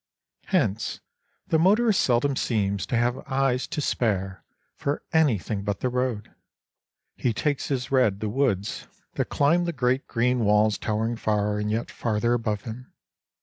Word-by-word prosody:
Hence, 115 - 0 0.5
the 160 - +2
motorist 210 +4 +4
seldom 130 +3 +2
seems 100 -6 -1
to 120 - 0
have 120 +2 +1
eyes 130 -1 +1
to 150 - -3
spare 95 -8 -1 0.3
for 145 +1 -3
anything 110 - +1
but 100 -1 -3
the 130 - +1
road; 125 -4 -2 0.8
he 120 - 0
takes 145 +4 -1
as 130 -3 -2
read 125 -7 +3
the 110 - -2
woods 105 -4 -1 0.3
that - - -1
climb 165 +5 +2
the 170 - -1
great 130 0 0
green 125 +1 +1
walls 105 -1 +3
towering 110 +2 -1
far 105 -1 0
and 105 0 -2
yet 110 +2 -2
farther 115 +1 0
above 110 -4 -1
him. 125 +3 -8
120 Hz, 150 wpm, -25 LUFS, 105-135 Hz, 0.8 s, motorist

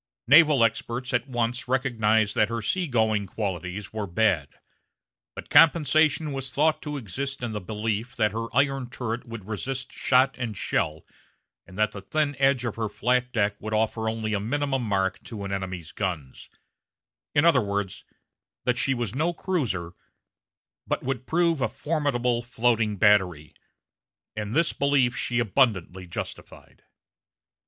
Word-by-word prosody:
Naval 145 -1 +6
experts 120 +3 -1
at 125 +2 0
once 120 -1 -2
recognized 110 -5 +2
that 105 0 +2
her 115 -1 -3
sea 180 +8 0
going 110 -5 +1
qualities 95 0 -4
were 105 -2 -3
bad; 85 -6 +1 0.9
but - - -9
compensation 155 -1 +5
was 135 -1 -4
thought 155 +4 +1
to 150 -1 -4
exist 135 +4 -5
in 120 - -2
the 105 -1 -4
belief 110 +5 -3
that 105 -4 +2
her 115 +2 -3
iron 135 -1 +1
turret 120 -2 -4
would 115 -4 -8
resist 130 +5 -4
shot 130 +1 +3
and 115 -5 -4
shell, 75 +1 -1 0.6
and 95 +1 -13
that 110 0 +2
the 100 - -8
thin 145 +7 -1
edge 135 -2 +3
of 115 - -3
her 110 -2 -1
flat 125 +3 0
deck 105 -4 +1
would 110 0 -3
offer 110 0 0
only 110 -1 -3
a 105 - +1
minimum 135 +5 -1
mark 95 -4 -1
to 105 -4 -7
an 100 - -5
enemy's 95 -4 -4
guns: 85 -10 -5 0.9
in 145 +2 +4
other 165 -7 +5
words, 100 -2 -3 0.6
that 125 -1 +1
she 135 +1 +2
was 120 -4 -3
no 160 +6 0
cruiser, 120 - -2 0.9
but - - -1
would 130 -1 -3
prove 165 -3 +2
a - - +1
formidable 135 -6 0
floating 115 -3 0
battery; 90 -7 +3 0.8
and 105 +2 -4
this 165 0 +2
belief 140 -3 +2
she 120 - -1
abundantly 100 -6 +1
justified. 85 - -8
115 Hz, 150 wpm, -26 LUFS, 105-135 Hz, 0.9 s, Naval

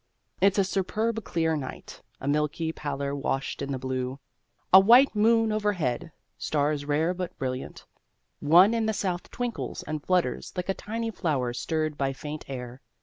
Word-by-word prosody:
It's 195 +1 +4
a 200 - +5
superb 215 +4 -1
clear 160 -3 0
night: 135 -4 -7 0.2
a 135 - -6
milky 150 +2 0
pallor 140 -2 -3
washed 135 -1 -2
in 140 0 -3
the 135 - -1
blue: 130 +1 -3 0.5
a 190 - +12
white 240 +6 +6
moon 225 +1 +4
overhead: 175 - -1 0.3
stars 145 -1 0
rare 155 +4 +1
but 180 -1 -5
brilliant, 130 -1 -5 0.5
one 175 +8 +6
in 225 -1 +1
the 220 - +1
south 180 -3 -2
twinkles 245 -2 -4
and 155 -1 -4
flutters 180 -9 0
like 180 +1 -3
a - - +3
tiny 225 +3 -4
flower 140 - -1
stirred 155 +2 -2
by 135 -1 0
faint 150 +2 -7
air. 125 -1 -7
160 Hz, 160 wpm, -27 LUFS, 140-195 Hz, 0.5 s, a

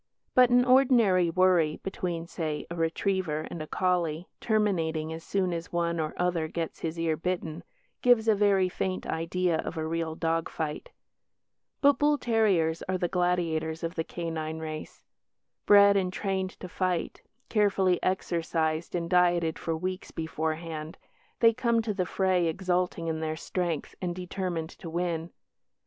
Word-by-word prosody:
But 250 -1 +6
an 245 0 +5
ordinary 240 -9 +5
worry 175 -3 +3
between 175 -3 -3
(say) 155 -3 -4
a - - -3
retriever 165 -1 0
and 170 - -5
a 155 - -6
collie, 175 -2 0
terminating 165 -8 0
as 165 0 -8
soon 185 -3 0
as 165 0 -5
one 170 -1 0
or 155 -1 -2
other 175 -3 0
gets 165 0 -4
his 165 0 -4
ear 165 -1 +1
bitten, 170 -1 -3 0.4
gives 240 -3 +4
a 220 - +6
very 200 -2 +3
faint 185 +1 -3
idea 165 +1 0
of 175 - -4
a 160 - -2
real 165 0 -2
dog 165 0 -1
fight. 155 -2 -4 0.9
But 285 0 +5
bull 295 0 +3
terriers 195 - +2
are 185 - +1
the 175 - 0
gladiators 170 -3 0
of 165 +1 -2
the 165 - -2
canine 160 -2 -4
race. 155 -1 -7 0.6
Bred 200 0 +7
and 185 -2 +1
trained 190 -1 -3
to 185 - -5
fight, 180 -1 -2 0.3
carefully 195 -4 +2
exercised 165 -3 -1
and 170 -1 -1
dieted 175 -2 +2
for 165 -1 -2
weeks 185 +2 -4
beforehand, 160 0 -4 0.4
they 230 -1 +6
come 235 0 +1
to 215 -2 -1
the 185 -3 -1
fray 185 -3 +1
exulting 180 0 -1
in 160 -1 -1
their 155 0 -2
strength 170 -2 -3
and 175 -2 -2
determined 180 -3 -4
to 170 - -9
win. 170 -1 -2
175 Hz, 155 wpm, -28 LUFS, 160-190 Hz, 0.9 s, Bred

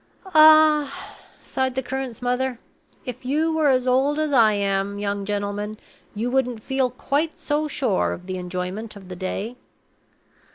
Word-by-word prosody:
"Ah!" 310 -2 +5 0.3
sighed 260 -1 -2
the 265 - -1
curate's 260 -2 -5
mother, 250 0 0 0.5
"if 250 -1 -7
you 310 +5 0
were 315 -2 +3
as 255 -1 +2
old 265 +4 +2
as 310 -2 0
I 225 -4 +5
am, 200 0 -1
young 200 -1 -2
gentleman, 205 +1 -3 0.4
you 235 +4 -2
wouldn't 250 -4 0
feel 265 -1 0
quite 285 +6 -2
so 300 +1 -1
sure 260 -9 0
of 180 - -7
the 185 0 -4
enjoyment 185 +5 -5
of 190 -2 -12
the 185 - -6
day!" 195 +6 -4
250 Hz, 155 wpm, -23 LUFS, 205-275 Hz, 0.5 s, Ah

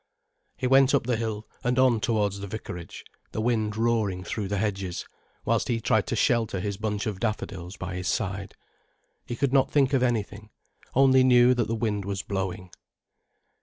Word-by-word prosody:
He 130 - -3
went 135 +2 +5
up 140 - +2
the 125 -1 +1
hill 110 -1 -4 0.2
and 125 +1 0
on 130 -3 +4
towards 105 -2 0
the 100 - -6
vicarage, 90 -4 -7 0.3
the - - -3
wind 110 -2 0
roaring 110 -5 0
through 105 +1 -3
the 100 +1 -2
hedges, 95 -3 -2 0.4
whilst - - +1
he 115 -2 0
tried - - +1
to - - -1
shelter 115 -5 +1
his 100 +2 -3
bunch 105 -1 -2
of 105 -3 -3
daffodils 95 -4 -4
by 90 0 -5
his 90 0 -4
side. 95 +2 -2 0.7
He 120 - -3
did 135 +2 0
not 135 -1 +4
think 140 -2 +3
of 135 - +3
anything, 110 -3 -1 0.5
only 130 0 +6
knew 125 -1 +6
that 120 -2 0
the 115 - -1
wind 105 -3 -1
was 100 -1 -3
blowing. 95 -2 -4
110 Hz, 180 wpm, -26 LUFS, 100-120 Hz, 0.7 s, only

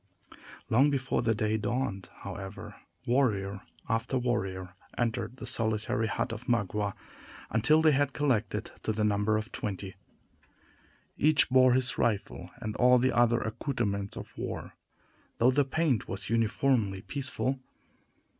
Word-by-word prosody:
Long 135 +6 +4
before 135 -2 0
the 115 -2 +1
day 110 +1 0
dawned, 105 -2 -2
however, 95 0 -7 0.3
warrior 100 -6 +1 0.3
after 115 +4 0
warrior 95 -7 -2 0.2
entered 120 +1 -1
the - - -7
solitary 110 -2 0
hut 110 - -2
of 115 +2 -7
Magua, 105 -3 0 0.6
until 135 +9 +4
they 155 - +6
had 140 -1 +2
collected 125 -8 0
to 110 - -1
the 105 0 -1
number 105 +1 +2
of 110 +2 -5
twenty. 95 -2 -4 1.3
Each 155 -1 +5
bore 130 -1 +6
his 130 0 +1
rifle, 100 -5 -1
and 110 -3 -5
all 125 0 +6
the 130 +2 +2
other 120 -1 +4
accouterments 110 -4 -2
of - - -9
war, - - -5 0.6
though 125 +3 +5
the 145 +2 +3
paint 140 -4 0
was 100 +3 -5
uniformly 115 -3 +1
peaceful. 135 -1 -2
115 Hz, 135 wpm, -29 LUFS, 105-130 Hz, 1.3 s, they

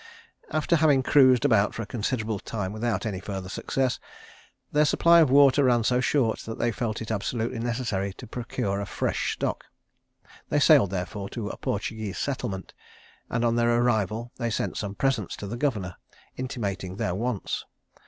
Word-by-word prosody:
After 155 +2 +1
having 145 -4 +4
cruised 130 -2 +5
about 105 -6 +3
for 115 - -3
a - - -6
considerable 110 0 -2
time 100 -2 -4
without 110 -2 -1
any 100 -4 -2
further 95 -1 -6
successes, 130 +5 -1 0.7
their 150 0 +4
supply 170 +3 +5
of 155 -5 +5
water 140 0 +6
ran 120 -2 +3
so 125 +2 +2
short, 125 -4 +1
that 115 - -7
they 120 - +1
felt 115 -2 -3
it 110 - -6
absolutely 115 +2 -2
necessary 115 -5 -2
to - - -11
procure 105 -4 -3
a 100 - -5
fresh - - -1
stock. - - -3 0.8
They 150 - +2
sailed, 145 - +6
therefore, 100 +2 -4
to 105 -3 -4
a - - -7
Portuguese 105 -1 -3
settlement; 120 -9 -3 0.6
and, 115 +1 0
on 115 0 +2
their 120 0 +3
arrival, 115 -1 0
they 120 -2 -1
sent 110 - -2
some 100 -1 -4
presents 125 -5 0
to - - -7
the 100 +4 -4
governor, 110 -10 -2 0.4
intimating 100 -8 -4
their 90 - -1
wants. 115 +1 -2
115 Hz, 170 wpm, -26 LUFS, 100-130 Hz, 0.8 s, water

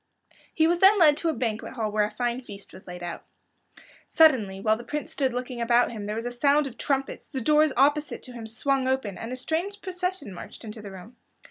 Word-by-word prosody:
He 320 - +2
was 345 +1 +2
then 390 +3 +7
led 305 -5 +6
to 335 - 0
a - - +1
banquet 225 -6 -3
hall 220 -4 -2
where 210 0 +2
a - - -4
fine 240 +3 -2
feast 200 -5 -11
was 185 - -14
laid 180 0 -8
out. 175 -1 -6 0.8
Suddenly, 240 -12 +4
while 215 +2 +2
the 235 - -9
Prince 295 +4 -4
stood 265 -3 0
looking 250 0 -4
about 235 +1 +3
him 210 -3 -6
there 210 - -3
was 230 +1 -4
a 245 - -2
sound 285 +4 +3
of 260 -3 -7
trumpets; 270 +2 -2
the 265 - -4
doors 300 +4 +4
opposite 290 +3 +2
to 250 - -9
him 230 -2 -8
swung 260 +4 0
open, 260 -7 -1
and 225 - -7
a - - -3
strange 335 +10 -3
procession 365 - -4
marched 175 - -10
into 215 0 -8
the 205 - -8
room. 195 +6 -12
250 Hz, 230 wpm, -26 LUFS, 220-300 Hz, 0.8 s, then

